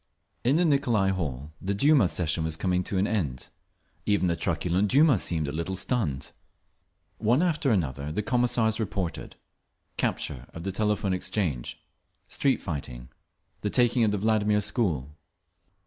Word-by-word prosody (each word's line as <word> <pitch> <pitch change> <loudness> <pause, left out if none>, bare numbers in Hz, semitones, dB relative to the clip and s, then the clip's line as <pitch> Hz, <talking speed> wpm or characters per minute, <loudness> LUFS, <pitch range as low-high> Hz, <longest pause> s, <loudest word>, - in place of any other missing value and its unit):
In 130 +4 +3
the 175 +2 +3
Nicolai 120 -10 +2
Hall 75 -6 -4
the 100 +2 -1
Duma 140 -1 +5
session 80 -2 0
was 80 -1 -1
coming 90 +2 0
to 100 - -2
an 95 - +2
end. 80 - -2 0.6
Even 100 -3 +2
the 85 - +1
truculent 90 +3 0
Duma 140 - +5
seemed 80 -4 -1
a - - -2
little 85 +5 -3
stunned. 90 - -2 0.9
One 120 +9 +3
after 155 -5 +1
another 75 - 0
the 105 +7 -2
Commissars 120 -2 +1
reported—capture 90 - -5
of 85 - -7
the 95 - -2
Telephone 105 -1 0
Exchange, 90 - -2 0.5
street 135 -4 0
fighting, 65 -6 -6 0.5
the 105 - -1
taking 120 +1 +3
of 110 - +3
the 105 - 0
Vladimir 105 0 +2
school…. 85 - -1
95 Hz, 145 wpm, -27 LUFS, 80-110 Hz, 0.9 s, Duma